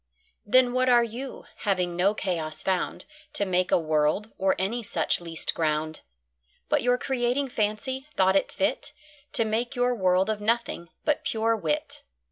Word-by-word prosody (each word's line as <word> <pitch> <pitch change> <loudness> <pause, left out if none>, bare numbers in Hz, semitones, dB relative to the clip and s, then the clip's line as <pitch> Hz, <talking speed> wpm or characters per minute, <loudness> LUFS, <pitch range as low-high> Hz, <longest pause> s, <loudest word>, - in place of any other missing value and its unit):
Then 250 +2 +5
what 255 0 +2
are 240 -1 +6
You, 240 +4 -6
having 180 -4 0
no 195 +4 +2
Chaos 160 -7 -3
found 185 -2 -1 0.3
To 205 - 0
make 185 -1 +1
a - - +6
World, 155 +6 +1
or 190 0 +3
any 215 +6 -1
such 225 -5 0
least 165 -2 -3
ground? 155 -1 -1 0.7
But - - +3
your 245 0 +3
Creating 255 +2 0
Fancy, 245 +4 -2
thought 190 0 +4
it 195 - +2
fit 295 +1 -1 0.4
To 235 -6 +1
make 235 +4 -1
your 245 0 +2
World 185 -3 +2
of 215 -1 -2
Nothing, 225 -6 -1 0.2
but 300 -1 +1
pure 225 0 +1
Wit. 160 -8 -2
210 Hz, 160 wpm, -26 LUFS, 180-245 Hz, 0.7 s, are